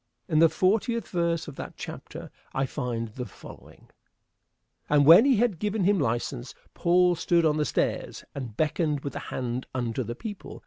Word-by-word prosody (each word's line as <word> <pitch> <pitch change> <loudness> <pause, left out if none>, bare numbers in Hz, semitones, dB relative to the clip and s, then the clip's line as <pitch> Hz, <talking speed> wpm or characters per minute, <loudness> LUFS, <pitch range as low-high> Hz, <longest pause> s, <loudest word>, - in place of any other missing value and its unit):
In 155 -3 +2
the 165 0 +7
fortieth 200 +5 +1
verse 170 -2 -1
of 145 - -8
that - - -7
chapter - - -8 0.2
I 135 - +1
find 115 -3 -3
the 125 +3 -6
following: - - -14 1.0
"And 145 -1 +4
when 170 - +9
he 275 -2 +5
had 215 -6 +1
given 210 0 -1
him 200 +1 +3
license, 120 - -2 0.2
Paul 180 +1 +3
stood 170 0 +2
on 155 -1 +2
the 150 - +1
stairs - - -2
and 125 -7 -7
beckoned 150 -2 0
with 140 -2 -5
the - - -4
hand 125 0 -3
unto 120 -1 -2
the 120 -1 -4
people. 205 - -8
155 Hz, 175 wpm, -27 LUFS, 130-180 Hz, 1.0 s, when